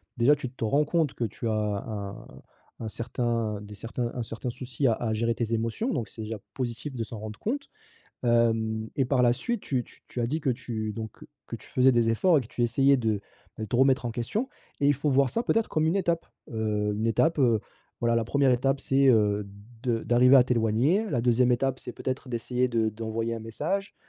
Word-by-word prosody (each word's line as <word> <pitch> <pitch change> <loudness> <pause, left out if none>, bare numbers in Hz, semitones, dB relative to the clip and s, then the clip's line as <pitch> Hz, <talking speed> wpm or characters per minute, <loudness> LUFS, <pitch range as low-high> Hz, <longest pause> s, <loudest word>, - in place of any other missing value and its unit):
déjà, 125 +5 +5
tu 130 -3 -5
te 130 - -7
rends 140 +7 +2
compte 160 -3 +1
que 120 - -2
tu 115 +2 -5
as 105 -2 -1
un 100 -3 -6 0.6
un 110 - -3
certain 115 -2 -2
des 105 0 -10
certains 120 +3 -3
un 120 - -2
certain 115 +2 -5
souci 130 +2 -2
à 115 - +4
à 110 -1 -2
gérer 115 +1 0
tes 115 -1 -2
émotions, 115 - -1
donc 120 -7 -2
c'est 110 - -10
déjà 110 0 -4 0.2
positif 130 +3 -4
de 115 - -2
s'en 110 -1 -7
rendre 105 0 -7
compte. 280 +6 -3 0.5
Hem 115 -2 +2
et 135 - +3
par 125 -1 +2
la 120 -1 +5
suite 235 - -2
tu 130 -3 -1
t - - -19 0.2
tu 125 - -4
as 115 - +1
dit, 155 +5 -1
que 140 - -2
tu, 115 -4 -3
donc 110 -1 -7 0.2
que - - -4
tu - - -16
faisais 130 +1 +5
des 115 -1 +3
efforts 165 +8 +4
et - - +1
que - - -11
tu 120 - -3
essayais 135 +4 +4
de 110 -4 0 0.4
de 110 - -3
te 115 - -1
remettre 130 0 +4
en 120 - -1
question 165 - -2 0.3
et 140 - +3
il 145 - +4
faut 145 +2 -1
voir 135 0 +3
ça, 230 - 0
peut-être 225 -2 +1
comme 155 0 +1
une 170 +5 +2
étape, 170 -3 0 0.2
heu, 105 -2 -1
une 110 +2 -1
étape, 155 +9 +2
heu, 115 -6 +4 0.4
voilà, 115 0 +2
la 115 -1 +1
1re 140 +2 +2
étape 135 +2 +2
c'est, 135 0 +3
heu, 105 -3 +3 0.4
de 120 -3 0
d'arriver 125 +3 +6
à 125 - +8
t'éloigner. 125 - +2
La 120 - +1
2e 125 +1 +3
étape 130 +2 0
c'est 125 - -7
peut-être 130 0 -4
d'essayer 125 +2 0
de 115 -2 +1
d'envoyer 115 +1 -3
un 115 - -6
message. 160 - -3
120 Hz, 225 wpm, -27 LUFS, 110-135 Hz, 0.6 s, à